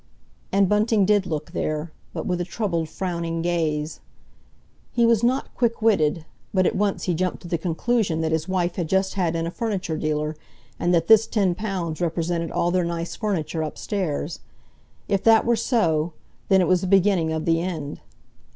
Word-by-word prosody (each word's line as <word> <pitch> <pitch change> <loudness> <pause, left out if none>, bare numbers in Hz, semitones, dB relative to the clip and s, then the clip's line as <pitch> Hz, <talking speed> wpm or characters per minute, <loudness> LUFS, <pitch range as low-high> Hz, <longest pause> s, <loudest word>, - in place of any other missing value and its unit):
And 195 0 +4
Bunting 210 0 +3
did 205 -1 +3
look 155 -3 -4
there, 155 +1 -2 0.2
but - - -5
with 180 -1 -1
a - - +1
troubled, 170 -4 -2
frowning 170 -2 -3
gaze. 160 -3 -1 0.9
He 235 -1 +3
was 230 -2 +4
not 255 +3 +1
quick 235 -2 0
witted, 165 -8 +2 0.3
but 185 -1 +4
at - - +1
once 200 0 0
he 180 - 0
jumped 180 +3 -2
to - - -8
the 170 -1 -1
conclusion 180 +1 0
that 160 0 0
his 160 +1 0
wife 180 -2 -1
had 170 -4 -2
just 190 +1 +1
had 175 -4 0
in 165 0 -1
a 170 - -3
furniture 190 -7 -2
dealer, 150 0 -1 0.4
and 175 - +1
that 165 -2 +3
this 220 +1 +6
ten 195 -5 +1
pounds 180 -5 -3
represented 170 0 -1
all 175 - 0
their 180 0 +2
nice 170 0 -3
furniture 175 -7 -2
upstairs. 160 -1 -3 0.7
If 195 -1 +1
that 225 -1 +6
were 235 0 +3
so, 170 - +1 0.3
then 190 -1 +5
it 180 - +2
was 185 -1 +3
the 185 - -2
beginning 185 -4 +3
of 160 0 -2
the 165 0 +2
end. 160 -5 -4
175 Hz, 185 wpm, -24 LUFS, 165-200 Hz, 0.9 s, this